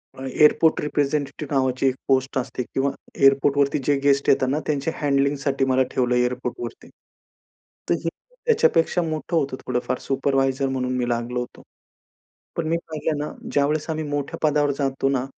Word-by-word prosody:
अ, 130 - -9
airport 150 +4 +4
representative 145 0 -2
नावाची 130 0 +1
एक 130 - +1
post 135 0 +1
असते 125 -1 -2
किंवा 135 +3 -1 0.2
एअरपोर्टवरती 140 +1 +3
जे 145 - +3
गेस्ट 140 0 +3
येतात 130 - +4
ना 150 +3 +1
त्यांच्या 150 +1 -1
हँडलिंग 140 -1 +1
साठी 135 -1 +1
मला 130 0 +3
ठेवलं 125 -1 +1
एअरपोर्टवरती. 125 -1 -2 1.0
तर - - +4
हे 165 - 0 0.4
त्याच्यापेक्षा 180 - +3
मोठं 160 +1 -3
होतं 135 -3 0
थोडंफार 125 -1 -1
सुपरवायझर 135 0 0
म्हणून 130 -1 -1
मी 125 -1 -1
लागलो 120 +1 -1
होतो. 125 - -7 0.9
पण 165 -3 -2
मी 165 - +2
पाहिलं 155 -1 -2
ना - - -6 0.2
ज्यावेळेस 150 +2 +1
आम्ही 155 0 -2
मोठ्या 145 -1 -3
पदावर 145 -1 +2
जातो 135 0 0
ना, 130 -1 0
135 Hz, 155 wpm, -23 LUFS, 130-150 Hz, 1.0 s, airport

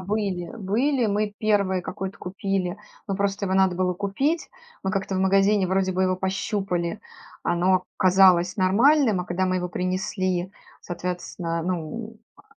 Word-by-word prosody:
были 190 -3 -2
были, 235 +6 +1
мы 205 0 -1
1 200 -4 +1
какой-то 190 +2 -5
купили, 190 0 -2 0.3
но 195 - -1
просто 200 0 -1
его 190 - 0
надо 190 -1 +3
было 185 0 +1
купить. 205 - -1 0.4
Мы 190 - 0
как-то 195 -1 -2
в - - 0
магазине 195 +1 +3
вроде 190 0 +1
бы 185 +1 0
его 185 0 +2
пощупали, 190 -1 -2 0.4
оно 185 +2 +2
казалось 185 -1 +5
нормальным, 220 +3 +4
а 180 - -4
когда 185 +1 -1
мы 185 0 +1
его 180 0 -2
принесли, 185 0 -2 0.3
соответственно, 175 -1 -4
ну, 185 +6 -4 0.2
а - - -19
190 Hz, 150 wpm, -24 LUFS, 180-200 Hz, 0.4 s, казалось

